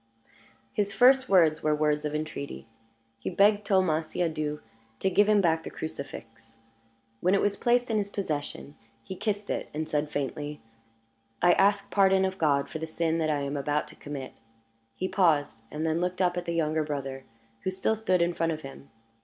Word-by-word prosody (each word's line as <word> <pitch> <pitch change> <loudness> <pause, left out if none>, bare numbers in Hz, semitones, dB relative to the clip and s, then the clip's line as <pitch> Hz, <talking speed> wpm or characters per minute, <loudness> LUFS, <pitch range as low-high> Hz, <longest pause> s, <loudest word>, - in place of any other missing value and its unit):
His 200 -1 -1
first 260 +4 +5
words 165 -5 +4
were 155 -1 +2
words 150 0 +1
of 150 0 -2
entreaty. 150 -5 -5 0.5
He - - -3
begged 205 +3 +4
Thomas 165 -5 +2
Siadoux 155 -3 -1 0.4
to 190 - +1
give 205 +3 +4
him 210 -1 +5
back 165 -3 +2
the - - -6
crucifix. 115 -7 -8 0.6
When 180 +7 +3
it - - +3
was 205 0 +1
placed 245 +2 +1
in 220 - +2
his 200 -1 -1
possession, 150 -6 -4 0.3
he 190 - -7
kissed 205 +1 -2
it, - - -3
and 155 0 -2
said, 150 -1 -1
faintly, 145 +1 -4 0.8
"I 175 - +5
ask 200 +1 +2
pardon 190 -1 +4
of 190 0 -3
God 140 -3 +2
for 155 - -6
the 160 - -4
sin 165 0 -1
that 155 -1 0
I 145 -2 0
am 140 +1 -3
about 145 +1 -1
to - - -13
commit." 140 -3 -7 0.6
He 185 - -2
paused, 160 - +2
and 155 +2 -3
then 160 +1 0
looked 180 +1 -2
up 180 -1 +2
at 175 0 -3
the 170 - -2
younger 155 -1 +1
brother, 135 -3 -5 0.4
who - - 0
still 190 +4 0
stood 185 -5 +2
in 175 0 0
front 165 -1 0
of 155 - -6
him. 135 0 -11
160 Hz, 190 wpm, -28 LUFS, 150-190 Hz, 0.8 s, first